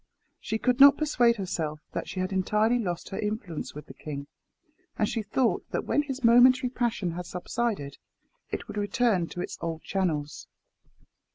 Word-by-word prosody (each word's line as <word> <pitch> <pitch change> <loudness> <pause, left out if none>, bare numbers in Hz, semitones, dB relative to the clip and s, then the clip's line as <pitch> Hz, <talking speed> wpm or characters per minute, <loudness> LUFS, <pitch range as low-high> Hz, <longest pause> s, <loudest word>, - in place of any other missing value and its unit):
She 220 - -2
could 250 +3 +1
not 280 +1 +9
persuade 245 -6 +3
herself 160 -7 -3
that - - -4
she 185 - -3
had 185 +1 -2
entirely 210 +5 +2
lost 175 -6 -3
her 195 - -5
influence 210 -9 -4
with 150 - -8
the - - -11
king; 140 -2 -7 0.7
and 210 - +2
she 225 - -2
thought 225 +4 0
that - - -2
when 290 - +2
his 275 -2 -6
momentary 250 +2 +6
passion 230 -8 -1
had 175 +1 -6
subsided, 185 -6 -3 0.5
it - - -5
would - - -7
return 205 -3 +1
to 175 - -6
its - - -6
old 165 -1 -4
channels. 155 -7 -2
210 Hz, 170 wpm, -27 LUFS, 175-240 Hz, 0.7 s, not